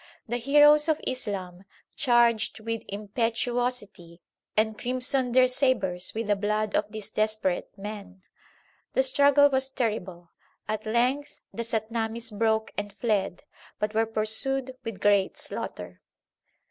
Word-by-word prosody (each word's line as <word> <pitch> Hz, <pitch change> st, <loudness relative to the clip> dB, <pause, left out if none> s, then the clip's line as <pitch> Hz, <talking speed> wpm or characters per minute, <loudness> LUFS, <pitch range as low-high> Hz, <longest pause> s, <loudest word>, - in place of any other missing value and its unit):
The 240 Hz, +2 st, -1 dB
heroes 295 Hz, +4 st, +5 dB
of 310 Hz, -, +2 dB
Islam 195 Hz, -8 st, -4 dB, 0.3 s
charged 235 Hz, -5 st, +2 dB
with 225 Hz, +1 st, -4 dB
impetuosity 215 Hz, -3 st, -3 dB, 0.4 s
and 220 Hz, 0 st, +2 dB
crimsoned 255 Hz, +1 st, -1 dB
their 255 Hz, 0 st, +6 dB
sabres 230 Hz, -10 st, 0 dB
with 225 Hz, +1 st, -2 dB
the 205 Hz, 0 st, +2 dB
blood 210 Hz, +1 st, -1 dB
of 210 Hz, 0 st, 0 dB
these 215 Hz, -1 st, -6 dB
desperate 215 Hz, -4 st, 0 dB
men. 200 Hz, -2 st, -8 dB, 0.7 s
The 265 Hz, -, +3 dB
struggle 285 Hz, +2 st, +5 dB
was 265 Hz, 0 st, +1 dB
terrible. 190 Hz, -9 st, -3 dB, 0.4 s
At 215 Hz, 0 st, -3 dB
length 250 Hz, +6 st, 0 dB
the 235 Hz, -, -4 dB
Satnamis 225 Hz, 0 st, -3 dB
broke 220 Hz, 0 st, +1 dB
and 205 Hz, -1 st, -6 dB
fled, 200 Hz, -3 st, -1 dB, 0.3 s
but 210 Hz, 0 st, -2 dB
were 225 Hz, +1 st, +1 dB
pursued 250 Hz, +5 st, +2 dB
with 225 Hz, -4 st, -7 dB
great 200 Hz, -2 st, +2 dB
slaughter. 90 Hz, 0 st, -6 dB
220 Hz, 125 wpm, -27 LUFS, 205-250 Hz, 0.7 s, their